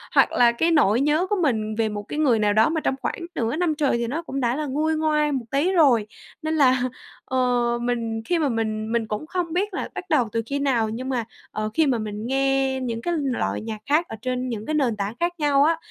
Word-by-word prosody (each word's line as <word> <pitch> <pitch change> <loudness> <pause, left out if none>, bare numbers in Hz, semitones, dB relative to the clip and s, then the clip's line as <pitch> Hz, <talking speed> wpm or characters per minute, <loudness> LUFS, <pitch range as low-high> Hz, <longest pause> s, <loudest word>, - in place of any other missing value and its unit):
Hoặc - - +5
là 240 -1 +5
cái 325 +8 +1
nỗi 245 -7 +4
nhớ 305 +6 +2
của 415 - +2
mình 220 -8 0
về 220 0 +1
một 205 -1 -5
cái 295 +8 -5
người 255 -7 +3
nào 210 -1 +2
đó 220 +7 +4
mà 320 0 -1
trong 265 - 0
khoảng - - -3 0.2
nửa 235 0 -1
năm 330 -2 0
trời 285 -5 +1
thì 235 0 -2
nó 295 +8 -2
cũng 275 -5 -5
đã 240 -1 +1
là 305 +1 -2
nguôi 305 +3 0
ngoai 305 -1 +1
một 260 -4 -2
tí 290 +7 +2
rồi, 270 - +4 0.3
nên 315 0 -1
là, 260 -4 +4 0.4
ờ, 260 - -2 0.4
mình 230 -2 -2
khi 345 +5 +1
mà 300 -3 +1
mình 220 -2 -2
mình 230 -1 0
cũng 215 +8 -4
không 345 -2 -2
biết 395 +3 -1
là - - -3
bắt - - -4
đầu 240 -9 +2
từ 230 - 0
khi 280 +4 -2
nào 245 -6 +1
nhưng 250 +4 -5
mà, 245 -4 -1 0.3
ờ, 215 0 -2
khi 320 +3 +3
mà 255 -3 +2
mình 210 0 -5
nghe 270 0 +1
những 230 -2 -3
cái 345 - -1
loại 265 -4 -1
nhạc 220 -1 -5
khác 305 +6 +2
ở - - -6
trên 255 0 -2
những 220 -3 -4
cái - - 0
nền 265 -7 +1
tảng 200 +1 -2
khác 345 +1 0
nhau 285 -2 +3
á, 325 +2 +3
260 Hz, 255 wpm, -23 LUFS, 225-305 Hz, 0.4 s, Hoặc